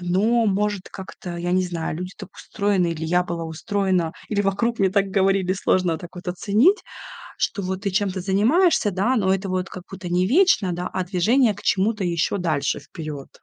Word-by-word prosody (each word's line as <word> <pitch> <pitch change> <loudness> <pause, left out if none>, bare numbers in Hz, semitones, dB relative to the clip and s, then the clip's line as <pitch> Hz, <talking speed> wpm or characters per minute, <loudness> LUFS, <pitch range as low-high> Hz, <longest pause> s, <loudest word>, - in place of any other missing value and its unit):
Но 215 +6 +2
может 205 -1 -1
как-то, 185 -2 -8
я 175 +1 -2
не 185 0 +3
знаю, 170 -3 -3
люди 180 +2 -6
так 195 -2 -11
устроены, 200 -4 0
или 160 0 -5
я 175 +2 +2
была 170 -2 -4
устроена, 180 +1 -1 0.2
или 205 -2 0
вокруг 205 +4 0
мне 195 -1 +3
так 200 0 +2
говорили, 195 -1 +2
сложно 180 -3 +1
так 175 - -10
вот 180 +1 -7
оценить, 215 - +3 0.6
что 200 - -1
вот 190 0 -3
ты 200 - -1
чем-то 190 -1 0
занимаешься, 215 - +3
да, 200 +8 +1
но 190 -5 +2
это 195 0 -3
вот 185 0 -2
как 185 - -9
будто 190 -2 -7
не 180 +1 +2
вечно, 255 - +3
да, 180 +1 -4
а 185 - -1
движение 210 +6 +3
к 205 - -12
чему-то 205 +1 +1
ещё 175 +3 0
дальше 155 -6 -1
вперёд. 155 -5 -8
190 Hz, 190 wpm, -23 LUFS, 180-205 Hz, 0.6 s, не